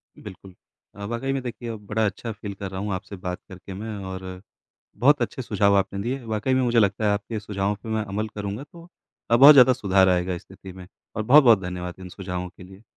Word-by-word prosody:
बिल्कुल। 95 -1 -12 0.4
अ, 100 - -9
वाक़ई 120 +5 -2
में 135 - -2
देखिए 120 -1 -6
अब 105 -2 -7
बड़ा 110 +1 0
अच्छा 110 +3 -4
फील 100 -1 -7
कर 100 -1 -6
रहा 95 - -5
हूँ 105 -2 -2
आपसे 100 +2 -6
बात 90 0 -3
करके 95 +1 -10
मैं 110 +2 -6 0.2
और 95 0 -7 0.6
बहुत 145 +4 +4
अच्छे 130 - -3
सुझाव 100 -3 +2
आपने 100 0 0
दिए, 125 +4 -3
वाक़ई 110 +4 -1
में 130 - +2
मुझे 120 -1 +2
लगता 105 0 +2
है 105 - +3
आपके 110 +2 -3
सुझावों 100 0 -2
पे - - -9
मैं 110 0 -1
अमल 105 +2 -3
करूँगा 105 +4 -5
तो 170 0 -14 0.4
अब 120 - +5
बहुत 140 +2 +11
ज़्यादा 130 -1 +7
सुधार 95 -5 +3
आएगा 90 0 +1
इस 85 - -8
स्थिति 95 0 -13
में 90 -1 -11 0.3
और 110 - -1
बहुत-बहुत 120 -4 +6
धन्यवाद 90 0 -5
इन 95 - -8
सुझावों 90 -1 -5
के 90 - -16
लिए। 95 +3 -14
100 Hz, 225 wpm, -24 LUFS, 95-115 Hz, 0.6 s, बहुत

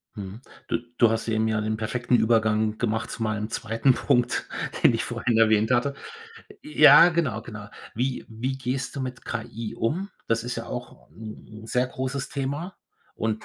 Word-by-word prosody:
Mhm, 100 +2 -7 0.3
du - - +1 0.2
du 115 - +6
hast 115 +1 -1
eben 110 0 +1
ja 110 -1 0
den 110 0 -1
perfekten 120 +3 0
Übergang 110 -1 +2
gemacht 110 -1 -1
zu - - -7
meinem 110 0 -2
2. 115 +4 +1
Punkt, 120 0 +1 0.4
den - - +7
ich - - -1
vorhin 115 -2 -1
erwähnt 110 0 +4
hatte. 125 +3 +2 0.7
Ja, 295 - +8
genau, 155 - -1
genau. 105 -3 -9 0.3
Wie 125 +3 -2
wie 125 +4 -3
gehst 130 0 -3
du - - -2
mit 130 -1 -5
KI 115 -1 -5
um? 180 - -1 0.2
Das 115 0 0
ist 125 - -3
ja - - -5
auch - - -8
‘n 110 0 -10 0.2
'n - - -10
sehr 125 +2 +1
großes 130 +1 -4
Thema 145 +6 -4 0.4
und 110 0 -2
115 Hz, 175 wpm, -25 LUFS, 110-130 Hz, 0.7 s, Ja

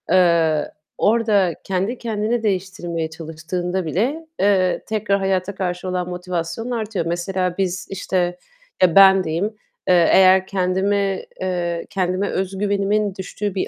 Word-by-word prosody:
Eee, 170 -4 +3 0.3
orada 210 -5 +2
kendi 195 +6 -2
kendini 225 0 -2
değiştirmeye 180 -5 -2
çalıştığında 165 +3 -4
bile, 255 - -1
eee, 190 -2 +2
tekrar 210 -2 0
hayata 190 0 -1
karşı 180 -1 -3
olan 180 -1 -2
motivasyonun 180 +5 -4
artıyor. 215 -6 -2
Mesela 180 +1 -2
biz, 185 -1 -2
işte, 180 -2 -1 0.4
ya, 180 -3 +4
ben 195 -1 +8
diyeyim, 165 +3 -1 0.4
eee, 175 -2 +5
eğer 190 0 +6
kendimi, 195 +1 0 0.2
eee, 175 -2 -2
kendime 185 +1 -1
özgüvenimin 200 +1 0
düştüğü 200 +1 -4
bir 190 - -1
185 Hz, 125 wpm, -21 LUFS, 175-200 Hz, 0.4 s, ben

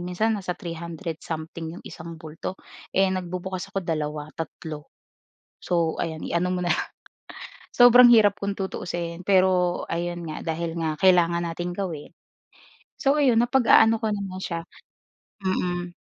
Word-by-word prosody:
Minsan 180 +6 0
nasa 180 -2 -3
300 170 0 -6
something 160 0 -6
'yong - - -12
isang 165 0 -9
bulto. 160 +3 -7 0.4
Eh, 195 - +5
nagbubukas 185 +1 -4
ako 195 -2 -4
2, 150 -2 -3
3. 155 -1 -7 0.8
So, 170 -2 +1
ayan 160 -1 -4
i-ano 180 +2 0
mo 180 - -1
na 175 - +3
lang. - - -1 0.9
Sobrang 245 0 +8
hirap 210 -2 +5
kung 200 0 -2
tutuusin, 175 -3 -4
pero 185 -2 +3
ayun 175 +1 -3
nga 155 - -5 0.2
dahil 170 0 -4
nga 160 -2 -2
kailangan 175 -2 +4
nating 175 +1 -4
gawin 175 -6 -5 0.9
so, 275 +1 +2
ayun 250 -5 +4
napag-aano 235 -2 +5
ko 220 - 0
naman 195 -3 -4
siya 165 -3 -4 0.8
mm. 175 -2 -2
175 Hz, 140 wpm, -25 LUFS, 165-195 Hz, 0.9 s, Sobrang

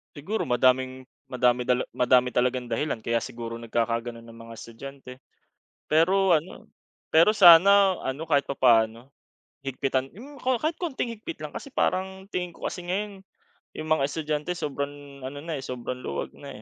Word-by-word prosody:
Siguro 190 +10 -3
madaming 130 +1 +2 0.2
madami 125 -1 +1
da 125 - +3 0.2
madami 125 0 +3
talagang 125 0 0
dahilan 115 0 -2
kaya 115 +1 0
siguro 115 -1 -5
nagkakagano'n 115 0 -2
ang 115 - -13
mga 115 - -10
estudyante. 125 +4 -10 0.8
Pero 185 +4 +4
ano 160 +4 -5 0.4
pero 165 +6 +5
sana, 195 0 +7
ano, 135 +5 -3
kahit 145 -3 +3
papaano 115 -3 +2 0.6
higpitan, 135 0 -2
yung 280 +6 -11
ko 255 -1 +1
kahit 310 +7 -1
konting 285 -8 -2
higpit 230 +10 -8
lang, - - -5
kasi - - -7
parang 190 -5 -1
tingin 180 -1 -2
ko - - -11
kasi 180 - -5
ngayon, 200 +2 -3 0.5
yung 155 - -6
mga 155 -2 +2
estudyante 150 +1 -3
sobrang, 145 -3 -6
ano 135 +2 -6
na, 160 +1 -4
sobrang 125 -1 -5
luwag 70 - -4
na, - - -10
140 Hz, 150 wpm, -26 LUFS, 125-180 Hz, 0.8 s, sana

